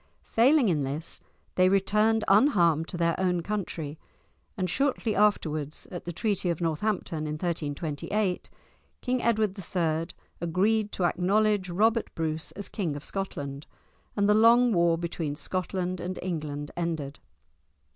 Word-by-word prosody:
Failing 260 +3 +5
in 160 -6 +1
this, 140 +4 -5 0.3
they 185 0 +4
returned 210 +3 +2
unharmed 175 - +4
to 180 - -5
their 170 -1 +2
own 180 -2 +1
country, 165 -7 -4 0.6
and 185 -2 0
shortly 255 +1 0
afterwards, 155 -8 +1
at 175 - -7
the 175 - -3
Treaty 195 0 -1
of 170 - -1
Northampton 165 -1 -1
in 150 - -3
1328, 170 +4 -2 0.5
King 250 -1 0
Edward 215 -4 +1
III. 165 -3 -1 0.3
agreed 205 +5 +1
to 180 - -1
acknowledge 195 +2 +2
Robert 220 +6 +2
Bruce 160 -1 -2
as 200 -1 -5
King 170 -8 -3
of 145 - -8
Scotland, 145 -7 -5 0.5
and 205 -1 +2
the 210 - +5
long 230 +2 +5
war 170 -2 +3
between 165 -3 -3
Scotland 185 +2 -3
and 180 +1 -4
England 150 -5 -4
ended. 160 -5 -3
180 Hz, 135 wpm, -27 LUFS, 160-210 Hz, 0.6 s, Failing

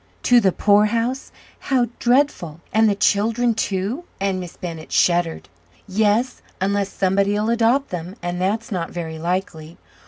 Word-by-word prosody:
"To 245 -1 +5
the 195 -4 +3
poorhouse! 230 +7 +1 0.3
how 260 -3 +1
dreadful! 240 - +1
And 220 0 +4
the 200 - +1
children, 225 +4 +2
too?" 210 - -2
and 195 -1 -1
Miss 180 -2 -8
Bennett 165 -3 -7
shuddered. 170 -2 +1 0.4
"Yes; 215 +5 +1 0.2
unless 200 +1 0
somebody'll 200 +3 +1
adopt 240 +4 +2
them, 180 +1 -5
and 175 0 -4
that's 215 +5 -1
not 175 -4 -2
very 160 -2 -6
likely. 170 -2 -4
200 Hz, 135 wpm, -21 LUFS, 180-230 Hz, 0.4 s, To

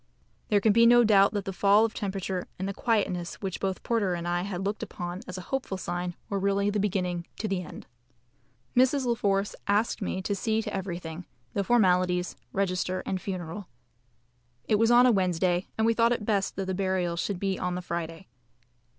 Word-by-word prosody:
There 205 - +3
can 210 +1 +3
be 230 +1 +6
no 240 0 +7
doubt 200 -3 +5
that 205 -2 -2
the 195 - -4
fall 200 +4 +5
of 225 - -3
temperature 190 -2 -3
and 190 - -3
the 200 - -3
quietness 195 -6 0
which 190 -3 -5
both 190 -1 -2
Porter 205 -6 +1
and 170 0 -4
I 175 0 0
had 190 0 -4
looked 205 +2 -2
upon 175 +1 -5
as 185 - -6
a - - -5
hopeful 265 -8 -2
sign, 175 -1 -3
were 200 - -2
really 200 +1 +1
the 210 - 0
beginning 180 -4 -1
to 215 - -2
the 195 -3 -1
end. 180 - -10 0.9
Mrs. 260 +2 +3
La 240 - +2
Force 200 -2 0
asked 210 +3 +1
me 190 - -2
to 205 - -1
see 220 +2 0
to - - -5
everything, 175 -3 -5 0.3
the 200 - 0
formalities, 180 -5 +2 0.2
register, 185 -1 -1
and 190 -1 -2
funeral. 185 0 -5 1.0
It 210 - +3
was 225 0 +4
on 240 +1 +7
a 250 - +6
Wednesday, 180 -2 +1
and 220 - +2
we 230 - +4
thought 230 +1 +3
it 225 -3 -4
best 200 -3 0
that 195 - -2
the 190 - -2
burial 185 -2 0
should 180 +2 -2
be 195 -1 -1
on 180 0 -1
the 180 - -3
Friday. 170 +1 -5
195 Hz, 200 wpm, -28 LUFS, 180-210 Hz, 1.0 s, no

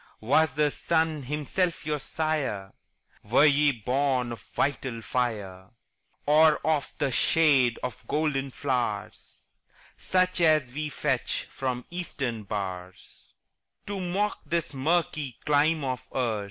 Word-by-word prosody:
Was 155 +7 +3
the 150 -1 +2
sun 160 -1 0
himself 150 +5 -2
your 150 -1 -1
sire? 140 -11 -2 0.5
Were 120 +8 +4
ye 145 0 +5
born 125 +1 0
of 115 -4 -7
vital 130 -3 -2
fire? 100 -7 -3 0.6
Or 155 +1 +6
of 155 -3 0
the 140 -2 0
shade 130 -1 +4
of 120 -3 -6
golden 145 -3 0
flowers, 120 -6 -4 0.5
Such 185 -1 +1
as 155 -6 +4
we 150 +1 -3
fetch - - -1
from 125 -2 -3
Eastern 135 - -3
bowers, 95 -3 -7 0.5
To 205 -1 -4
mock 190 +3 -1
this 170 -2 -1
murky 150 -2 0
clime 150 +1 +3
of 130 -1 -3
ours? 115 -5 0
140 Hz, 120 wpm, -27 LUFS, 120-155 Hz, 0.6 s, Or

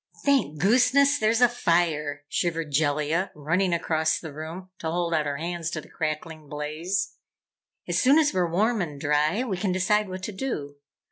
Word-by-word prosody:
"Thank 270 - +2
gooseness, 255 - +4
there's 220 +2 +2
a 245 - +8
fire!" 165 -9 0
shivered 165 0 -1
Jellia, 150 +4 +1
running 170 +5 0
across 160 -2 +1
the 160 -3 -8
room 165 +5 -8
to 160 - -3
hold 170 0 -1
out 155 -2 +1
her 140 -1 -2
hands 170 +1 -3
to 170 - -4
the - - -13
crackling 155 -1 -4
blaze. 155 +6 -3 0.7
"As - - +1
soon 270 +4 +5
as 305 -2 +3
we're 180 -2 +1
warm 215 +6 +1
and 150 -5 -4
dry 150 - +1
we 205 -8 -3
can 190 0 -1
decide 200 +3 +1
what 185 0 -6
to 215 - -3
do. 155 - -4
170 Hz, 180 wpm, -26 LUFS, 155-200 Hz, 0.7 s, a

